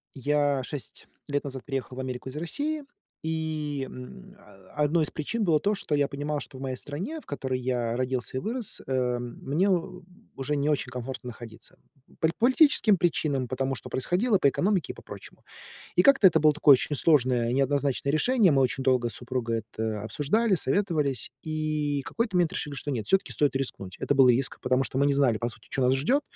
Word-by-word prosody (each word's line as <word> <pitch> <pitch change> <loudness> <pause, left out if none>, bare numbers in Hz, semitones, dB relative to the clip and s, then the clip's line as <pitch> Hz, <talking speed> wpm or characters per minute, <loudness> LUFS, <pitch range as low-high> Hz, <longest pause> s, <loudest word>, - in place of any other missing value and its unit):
Я 145 0 +1
6 135 +1 -8 0.2
лет 145 0 -1
назад 135 -2 -6
приехал 135 -2 -4
в - - -4
Америку 130 0 -5
из 130 - -8
России. 290 - -3 0.4
И, 155 -3 -2
м, 125 - -11
э, 95 -1 -19
1 150 +2 +2
из - - -7
причин 215 +9 -2
было 160 -5 +3
то, 205 +5 +1
что 155 - -3
я 145 -1 +2
понимал, 145 +1 -3
что 130 - -9
в - - -11
моей 135 -1 -3
стране, 180 - -5
в - - -21
которой 130 -2 -3
я 120 -2 -1
родился 130 0 -2
и - - 0
вырос, 230 - -4
э, 125 -2 0
мне 140 +10 -1
у 185 0 -1 0.3
уже 140 +2 -2
не 140 +1 0
очень 140 -3 -1
комфортно 125 +1 -6
находиться. 115 -2 -11 0.4
По 160 - +2
политическим 255 -4 +5
причинам, 150 -6 0
потому 135 +1 -1
что - - -8
происходило, 190 - +1
по 140 - +4
экономике 190 +6 0
и - - -20
по - - -12
прочему. - - -12 0.5
И - - +6
как-то 275 -8 +7
это 160 -3 +3
было 155 0 +6
такое 150 -1 +6
очень 140 +3 +1
сложное 125 -6 +3
и - - 0
неоднозначное 140 0 +1
решение. 215 +3 +4
Мы 135 -2 +3
очень 130 +1 0
долго 125 -2 +2
с - - -9
супругой 120 -3 -3
это 110 -2 -3
обсуждали, 195 - +1
советовались 150 - 0
и 155 -2 -2
какой-то 230 -4 -2
момент 175 -2 +2
решили, 145 -2 -3
что 145 - -4
нет, 110 -6 -3
всё-таки 195 - +2
стоит 145 -2 +1
рискнуть. 100 -8 -4
Это - - +1
был 135 -1 +7
риск, 125 +2 +2
потому 130 +1 +2
что 130 - -4
мы 140 - +4
не 140 - +3
знали, 135 -5 +3
по 120 - -1
сути, 110 -1 -10
чё 135 - -1
нас 130 +1 +4
ждет. 245 - +2
140 Hz, 205 wpm, -27 LUFS, 130-160 Hz, 0.5 s, как-то